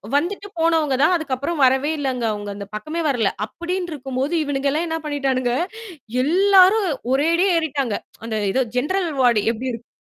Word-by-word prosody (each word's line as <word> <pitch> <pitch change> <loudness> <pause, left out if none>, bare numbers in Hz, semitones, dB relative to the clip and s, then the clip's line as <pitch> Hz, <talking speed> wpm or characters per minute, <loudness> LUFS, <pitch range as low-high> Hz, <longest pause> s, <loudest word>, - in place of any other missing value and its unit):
வந்துட்டு 390 +7 -1
போனவங்க 325 -4 +2
தான், 315 - +4
அதுக்கப்புறம் 290 0 -2
வரவே 265 +3 +3
இல்லங்க. 260 -4 -2
அவுங்க 205 -1 -5
அந்த 200 0 -7
பக்கமே 310 +11 -4
வரல. 235 -7 +1 0.2
அப்டின்ட்டுருக்கும்போது, 310 - -4
இவனுங்கல்லாம் 285 +3 -1
என்னா 325 0 -2
பண்ணிட்டானுங்க? 265 -4 0 0.7
எல்லாரும் 380 +5 +5 0.2
ஒரேடியே 335 +7 +2
ஏறிட்டாங்க. 275 -8 -2 0.3
அந்த 220 -1 -2
ஏதோ 260 +5 +2
ஜெனரல் 350 +7 0
வார்டு 235 -5 +4
எப்படி 250 +3 -4
இருக் 230 +1 -9
285 Hz, 140 wpm, -21 LUFS, 255-335 Hz, 0.7 s, எல்லாரும்